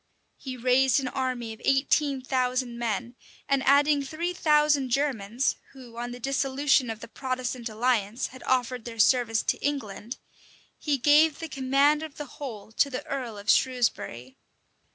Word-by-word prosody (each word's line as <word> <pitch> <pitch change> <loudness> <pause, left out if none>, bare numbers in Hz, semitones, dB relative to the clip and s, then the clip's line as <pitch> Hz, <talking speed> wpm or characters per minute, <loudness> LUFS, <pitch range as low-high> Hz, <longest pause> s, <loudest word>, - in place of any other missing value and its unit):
He 260 -2 -6
raised 255 +2 +3
an 260 -2 -3
army 250 -3 -3
of 220 - -15
eighteen 270 0 +1
thousand 255 -2 -1
men, 235 +1 -2 0.3
and 275 -1 +2
adding 285 +1 +5
three 325 +6 -3
thousand 300 -5 +3
Germans, 245 -3 0 0.2
who, 250 -4 -13
on 240 +1 -4
the 245 0 -8
dissolution 270 0 +1
of 225 0 -5
the - - -8
Protestant 255 -1 -4
alliance, 225 0 0
had 260 - -12
offered 250 -2 0
their 235 -1 -8
service 225 0 +3
to - - -2
England, 250 -4 -3 0.6
he 290 -2 0
gave 295 +3 +4
the 325 - -6
command 275 +2 +2
of 315 -2 -8
the 295 - -5 0.2
whole 220 -6 -7
to 280 +5 +2
the 255 - -5
earl 250 -6 -4
of 205 +1 -11
Shrewsbury. 220 - 0
255 Hz, 155 wpm, -27 LUFS, 235-280 Hz, 0.6 s, adding